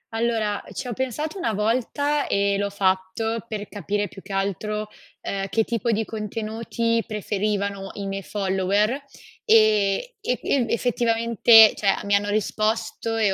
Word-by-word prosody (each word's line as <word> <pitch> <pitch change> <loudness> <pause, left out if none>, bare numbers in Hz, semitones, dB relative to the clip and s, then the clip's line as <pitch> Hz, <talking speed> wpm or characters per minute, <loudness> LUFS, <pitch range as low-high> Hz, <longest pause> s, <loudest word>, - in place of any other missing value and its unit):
Allora, 225 -3 0
ci - - -5
ho 245 - -3
pensato 295 - -3
una 230 -11 -1
volta 255 +7 0
e 200 0 +1
l'ho 200 0 0
fatto 195 +3 -1
per 210 -2 -5
capire 205 0 -2
più 195 - -12
che 195 - -12
altro, 200 +2 -2 0.3
ehm, 195 0 -3
che 225 - +2
tipo 235 +1 -2
di 220 0 0
contenuti 225 +2 -2
preferivano 200 -2 -2
i 200 - -6
miei 195 0 -3
follower, 195 +1 0 0.5
e 215 - +3
e 465 +4 -1
ev 250 -4 +1
effettivamente, 230 -2 +5
cioè 205 - -3
a - - +3
mi 200 - 0
hanno 205 0 +2
risposto 220 +2 -1
e 210 -3 +2
215 Hz, 150 wpm, -24 LUFS, 200-230 Hz, 0.5 s, effettivamente